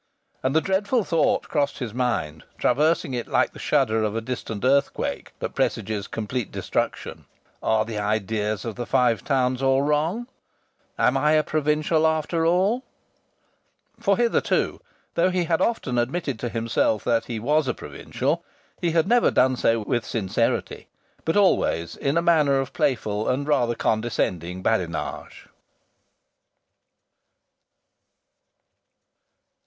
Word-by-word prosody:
And 130 +3 0
the 160 - +5
dreadful 205 +6 +1
thought 165 -4 +1
crossed 145 -2 0
his 120 -5 -5
mind, 115 -12 -2
traversing 150 +1 +2
it 120 -1 -3
like - - +1
the - - -11
shudder 110 -7 +1
of 105 0 -1
a - - +1
distant 115 -2 -5
earthquake 140 +1 0
that - - -4
presages 100 -1 -1
complete 115 +1 -4
destruction: - - -3 0.4
"Are 110 -1 +2
the 110 -2 -4
ideas 105 0 -1
of 115 -3 -5
the 120 - -4
Five 125 -4 +2
Towns 130 -2 +1
all 135 0 +3
wrong? 155 +10 0 0.7
Am - - +3
I 150 +1 +3
a 155 0 +4
provincial 155 +1 +1
after 160 +1 0
all?" 195 +9 +2 1.2
For 200 -4 +2
hitherto, 235 -1 +1 0.3
though 175 +2 +3
he 180 -1 0
had 165 -1 0
often 130 - 0
admitted 135 0 -2
to 120 - -3
himself 115 -2 0
that 115 -2 +1
he 115 -3 -4
was 150 +5 +1
a - - +1
provincial, - - -3 0.4
he 170 -2 0
had 165 +1 +2
never 240 +2 +4
done 130 0 +3
so 115 -2 +1
with 120 +3 -1
sincerity: 110 +1 -1 0.4
but 160 - +1
always 85 - +2
in 140 +3 -1
a 170 - +2
manner 150 -5 +4
of 135 0 -4
playful 110 -5 0
and 140 +3 -1
rather 120 -6 +2
condescending 95 -7 -1
badinage. 90 -7 -2
130 Hz, 135 wpm, -24 LUFS, 110-160 Hz, 1.2 s, the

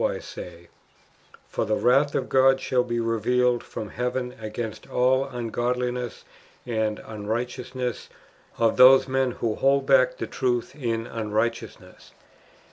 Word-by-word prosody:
471 - - 0
wise - - -11 0.4
say: 85 - -23 0.4
" - - -27
For - - 0
the 110 -1 0
wratli 140 +4 +3
of 130 - -1
God 135 0 +4
shall 130 -1 +1
be 120 -1 -2
revealed 120 +2 +1
from 105 - -7
heaven 125 +2 -3
ao; - - -6
ainst 110 0 -6
all 130 +2 +2
uncrodllness 125 +1 -3 0.4
and 110 -3 -1
unrio; 110 +2 -3
hteousness 125 -1 -5 0.5
of 115 -1 +2
those 130 +1 +8
men 130 0 +1
who 115 -3 -2
hold 135 +4 +2
back - - +4
the - - -3
truth 125 -3 -2
in 115 -5 -2
unrighteousness." 110 +1 -4
125 Hz, 145 wpm, -25 LUFS, 115-130 Hz, 0.5 s, those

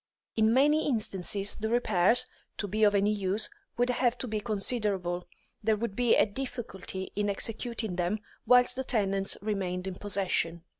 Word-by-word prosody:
In 220 0 +3
many 295 +5 +3
instances 200 -5 +1
the 220 +1 -3
repairs, 230 0 +4 0.3
to 205 - -2
be 215 +3 0
of 205 -1 +5
any 200 +1 +3
use, 200 0 +1 0.3
would 245 +1 +2
have 245 -1 +1
to 255 - -5
be 215 -1 -2
considerable; 200 -5 -2 0.4
there 220 0 +3
would 210 -1 -4
be 245 0 +3
a - - +5
difficulty 215 -5 -6
in 205 0 0
executing 225 -1 -1
them 180 +4 0 0.3
whilst 250 0 +5
the 265 - -2
tenants 195 -5 0
remained 190 -4 -2
in 190 - -3
possession. 180 -4 -2
210 Hz, 160 wpm, -29 LUFS, 195-235 Hz, 0.4 s, of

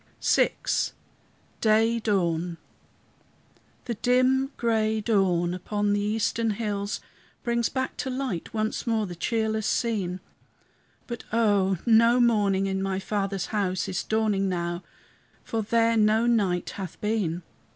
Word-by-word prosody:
VI - - +3 1.1
DAY 225 +1 +3
DAWN 175 -5 0 1.3
The 240 - -2
dim 255 +4 +2
gray 220 -2 +1
dawn, 190 -5 +1
upon 205 +3 -1
the 205 - +1
eastern 220 +2 0
hills, 205 -2 -2 0.4
Brings 235 -2 +1
back 260 -1 -3
to 265 - -3
light 255 -10 -3
once 220 +1 -2
more 225 -2 +1
the 180 - -6
cheerless 220 +3 -1
scene; 195 -6 -1 0.9
But 235 -1 -6
oh! 205 -4 +2
no 230 +1 +5
morning 205 -5 +3
in 190 0 -1
my 195 -1 -1
Father's 195 0 -2
house 190 -4 0
Is 190 -1 -2
dawning 215 -3 +1
now, 175 -1 -2 0.6
for 225 - -2
there 230 +2 +2
no 215 +2 +3
night 200 -7 +1
hath 190 -4 -7
been. 200 -6 -1
215 Hz, 125 wpm, -26 LUFS, 190-230 Hz, 1.3 s, no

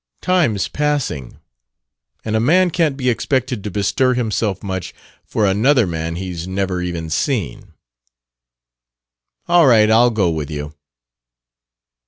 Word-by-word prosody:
Time's 170 - +1
passing. 145 - -2 0.9
And 110 0 -1
a - - +2
man 175 +9 +3
can't 155 -5 0
be 130 -2 -3
expected 125 -2 -1
to 105 - -4
bestir 105 +6 +1
himself 110 -5 -2
much 95 -3 -5 0.3
for 110 - -1
another 115 +6 +3
man 85 -1 -4
he's 90 -1 -5
never 95 -1 -2
even 85 -2 -4
seen." 100 - -2 1.7
"All 170 -3 +5
right. 110 -3 +5
I'll 120 +2 +5
go 100 -7 +1
with 80 -3 -4
you." 75 -1 -6
105 Hz, 125 wpm, -18 LUFS, 90-130 Hz, 1.7 s, All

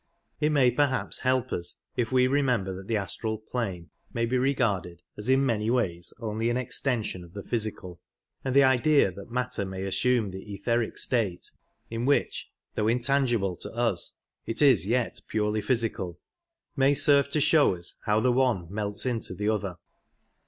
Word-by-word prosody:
It 150 0 +2
may 135 -4 +4
perhaps 135 +1 0
help 130 -1 0
us 85 0 -3 0.2
if 120 -1 -1
we 130 -1 +4
remember 125 -8 +1
that 95 +1 -9
the 115 - +1
astral 105 +3 -2
plane 100 - -4 0.2
may 115 0 0
be 120 +3 -1
regarded 115 - 0
as 105 +4 -5
in 135 +1 +4
many 110 -3 0
ways 90 -9 0
only 110 0 -1
an 120 - 0
extension 120 -6 -2
of 85 0 -15
the 100 - -7
physical, 105 -6 -4 0.4
and 130 -1 -2
the 140 - +7
idea 130 -3 +4
that 100 +5 -11
matter 125 -2 -1
may 95 0 -5
assume 115 +1 +1
the 95 +1 -7
etheric 115 +3 -1
state 110 -8 -1 0.4
(in 115 +1 -2
which, 145 - +1 0.2
though 105 - 0
intangible 120 -5 +1
to - - -6
us, 115 -7 0 0.3
it 115 - -2
is 130 - +5
yet 120 +2 0
purely 105 0 0
physical) 105 -6 -1 0.6
may 135 0 +4
serve 140 -1 +5
to 150 - +1
show 150 - +4
us 85 0 -7
how 105 0 +3
the 125 +3 +3
one 120 -8 +2
melts 105 +1 -2
into 115 -7 -2
the 105 +3 -1
other. 100 -4 -1
115 Hz, 170 wpm, -27 LUFS, 100-130 Hz, 0.6 s, the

